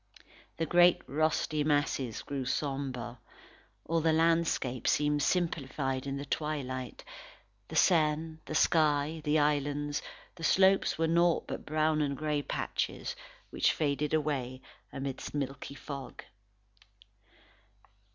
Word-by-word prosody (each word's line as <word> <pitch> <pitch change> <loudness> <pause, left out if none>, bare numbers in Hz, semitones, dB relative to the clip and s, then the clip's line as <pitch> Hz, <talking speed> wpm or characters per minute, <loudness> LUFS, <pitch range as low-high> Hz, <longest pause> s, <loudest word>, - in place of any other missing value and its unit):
The 165 - 0
great 175 +1 +5
russety 155 0 0
masses 145 -5 0
grew 140 -2 -3
sombre; 130 -3 -3 0.7
all 165 +1 +1
the 160 0 +3
landscape 165 -6 +1
became 150 0 +2
simplified 140 -6 -1
in 135 0 -2
the 140 - -5
twilight; 130 -4 -3 0.6
the - - -8
Seine, 160 -1 +2
the 155 - -5
sky, 155 0 +2
the 150 0 +2
islands, 145 0 0 0.3
the 165 - -11
slopes 190 +3 +4
were 165 - +2
naught 170 +1 +3
but - - -6
brown 155 0 +2
and 140 -2 -1
grey 150 -1 -1
patches 485 - -3 0.4
which - - +2
faded 150 -1 -1
away 135 -5 -1 0.3
amidst 135 +1 -5
milky 140 0 -4
fog. 140 -4 -8
150 Hz, 115 wpm, -31 LUFS, 140-160 Hz, 0.7 s, great